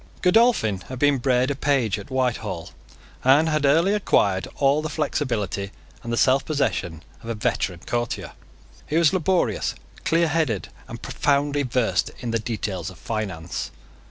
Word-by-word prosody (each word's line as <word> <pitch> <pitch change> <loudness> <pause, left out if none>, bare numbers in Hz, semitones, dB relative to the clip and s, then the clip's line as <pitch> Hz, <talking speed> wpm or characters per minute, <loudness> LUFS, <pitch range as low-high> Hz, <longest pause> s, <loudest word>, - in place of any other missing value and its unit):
Godolphin 180 - +4
had 130 - -6
been 145 0 +3
bred 125 +1 +2
a - - -2
page 130 -7 +1
at 100 - -10
Whitehall, 115 -9 -2 0.5
and 140 +5 +5
had 155 -2 +2
early 165 +8 +4
acquired 100 - +2
all 140 +2 +3
the 155 - -4
flexibility 120 - -2 0.3
and 120 - -6
the 115 - 0
selfpossession 130 - +1 0.2
of 115 - -9
a 115 - -1
veteran 95 -4 -1
courtier. 120 0 -2 0.6
He 155 - 0
was 165 -3 +4
laborious, 175 - +1 0.3
clearheaded, 160 - +1 0.2
and - - -9
profoundly 145 0 +1
versed 115 -7 0
in 120 -2 -4
the 115 - +1
details 105 -6 -3
of 95 - -13
finance. 95 -5 -4
125 Hz, 145 wpm, -24 LUFS, 105-145 Hz, 0.6 s, and